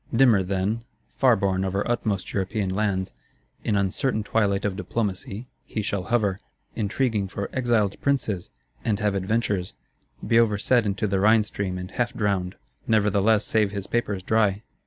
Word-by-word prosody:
Dimmer 115 -5 +5
then, 100 +4 -1 0.3
far 130 -3 +5
borne 95 -3 0
over 95 +1 -1
utmost 110 -5 -1
European 100 0 -1
lands, 95 -2 -1 0.5
in 105 - 0
uncertain 105 +4 0
twilight 100 -2 +1
of 100 -2 -1
diplomacy, 105 +1 -3 0.2
he 110 - -4
shall 100 -2 -2
hover, 105 -4 +1 0.4
intriguing 110 -1 0
for 100 +1 -5
"Exiled 115 -6 +1
Princes," 120 -10 0 0.3
and 105 -3 0
have 105 -2 +1
adventures; 100 -1 -1 0.5
be 115 - +4
overset 115 +1 +3
into 100 +1 -1
the 95 -2 +1
Rhine 110 +2 +5
stream 100 -3 -4
and 90 +1 -6
half 120 +4 -1
drowned, 100 -5 -1 0.3
nevertheless 105 0 +3
save 110 -2 +2
his 100 -1 -5
papers 100 -5 -1
dry. 105 -1 +2
105 Hz, 150 wpm, -25 LUFS, 95-115 Hz, 0.5 s, Dimmer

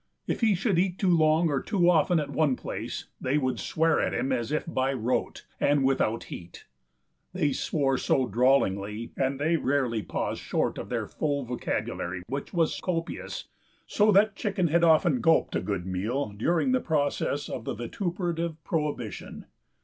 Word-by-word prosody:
If - - -2
he 220 -3 +4
should 195 -1 +1
eat 185 0 +1
too 185 -4 +3
long 160 +1 +4
or 140 -2 0
too 190 -6 +1
often 175 0 +4
at 150 - -3
one 150 -5 +2
place - - -5 0.2
they 130 +3 +1
would 130 -3 -1
swear 165 +1 +1
at - - -1
him 135 - -1
as 120 0 -1
if 155 - -1
by 135 -5 0
rote 125 0 -2
and 145 -1 +3
without 130 -4 +1
heat. 85 0 -10 0.7
They 145 -2 +1
swore 135 -2 0
so 130 - +2
drawlingly, 110 -3 +1
and 135 0 -1
they 160 +3 +2
rarely 130 -6 0
paused - - -3
short - - -1
of - - -7
their - - -1
full 145 -2 -2
vocabulary, 90 -6 -3
which 140 +2 -4
was 165 -3 0
copious, 165 -2 -3 0.4
so 210 +1 +3
that 200 +1 +4
Chicken 195 -6 0
had 170 +2 +3
often 160 -5 +4
gulped 165 -1 +3
a - - +1
good 95 -4 -3
meal 105 +9 -2
during 165 - +1
the 255 -1 +2
process 145 -2 0
of 120 - -6
the - - -3
vituperative 170 - -3
prohibition. 145 - -3
145 Hz, 170 wpm, -27 LUFS, 125-170 Hz, 0.7 s, he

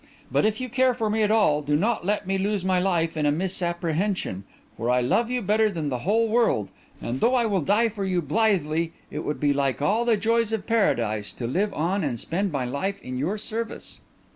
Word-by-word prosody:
But - - +3
if 215 0 -2
you 255 - -3
care 255 +1 +2
for 220 -2 -1
me 220 +1 +1
at 210 - +2
all 180 -9 +3
do 145 0 0
not 210 +5 +1
let 205 +2 -1
me 195 +1 -1
lose 200 -1 -1
my 185 -1 +2
life 170 -3 0
in 150 -1 +1
a - - +3
misapprehension; 170 - -2 0.3
for 115 - -3
I 125 0 +3
love 220 - +1
you 250 -2 -1
better 215 +2 +3
than 160 -7 -3
the 125 -2 -2
whole 220 - +2
world; 215 - +1 0.3
and 125 +3 -4
though 245 +3 +3
I 240 -2 +2
will 200 -5 +1
die 210 +8 +3
for 210 -2 -5
you 185 -2 0
blithely, 165 -2 +1 0.2
it 150 +2 -4
would 150 - -3
be 145 -1 +2
like 140 -2 0
all 205 +11 +2
the 235 -2 +2
joys 225 +1 +1
of 220 - -2
Paradise 115 - +1
to 120 - -5
live 185 - 0
on 185 +5 0
and 125 -6 -2
spend 190 - -2
my 135 -4 -1
life 190 +11 -3
in 125 0 -5
your 180 +10 -1
service." 225 +1 -5
190 Hz, 225 wpm, -25 LUFS, 150-215 Hz, 0.3 s, But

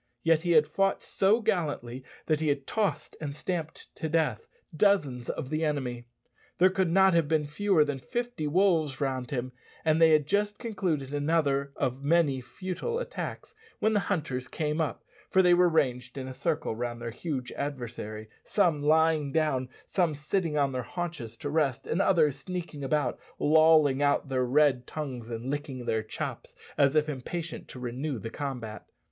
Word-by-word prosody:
Yet 165 -1 +4
he 170 0 +1
had 155 -2 +6
fought 195 +5 0
so 205 +5 +2
gallantly 145 - -1 0.2
that 155 -2 +1
he 160 - -1
had 140 -2 0
tossed 205 -7 -1
and 145 -2 -4
stamped 160 -1 -4
to 160 - -3
death 150 -9 0 0.3
dozens 150 - +2
of 140 -3 -4
the 155 +1 0
enemy. 125 -6 -2 0.5
There 185 +2 +5
could 190 -2 +1
not 190 +2 +5
have 165 -3 +3
been 155 -1 +1
fewer 160 +1 +2
than 145 -2 -3
fifty 240 - -3
wolves 160 -4 +2
round 130 -3 -2
him; 130 -3 -3 0.3
and 160 +1 +3
they 165 - +8
had 150 -2 +4
just 205 +5 0
concluded 175 - -2
another 145 -2 +1
of 130 0 -2
many 145 -3 +3
futile 185 - -4
attacks - - -5 0.2
when 220 - +2
the 210 - +3
hunters 145 -11 -2
came 150 +3 -1
up, 155 - -3 0.3
for 190 - +4
they 180 -1 +6
were 175 0 +5
ranged 130 -6 0
in 130 -1 -4
a 130 - -6
circle 155 -5 -1
round 120 0 -4
their 115 0 -5
huge 130 -1 -4
adversary 120 -6 -5 0.2
some 175 -8 +2
lying 155 -1 +3
down, 135 -5 +1 0.2
some 175 -5 +1
sitting 150 +2 -1
on 140 -2 +2
their 130 -1 -2
haunches 150 -7 -5
to 145 - -4
rest, 145 -5 +1
and 175 - 0
others 160 -8 +3
sneaking 175 -6 -5
about, 150 +2 0 0.2
lolling 155 -2 +5
out 145 0 +2
their 130 -1 +1
red 130 -1 +3
tongues 130 -7 -5
and 120 +3 -4
licking 135 -4 -4
their 110 -1 +1
chops 110 - -6 0.2
as 140 +1 +3
if 155 0 +3
impatient 155 +4 -5
to 130 - -10
renew 125 +3 -3
the 115 +2 -6
combat. 120 -7 -5
150 Hz, 175 wpm, -28 LUFS, 130-170 Hz, 0.5 s, they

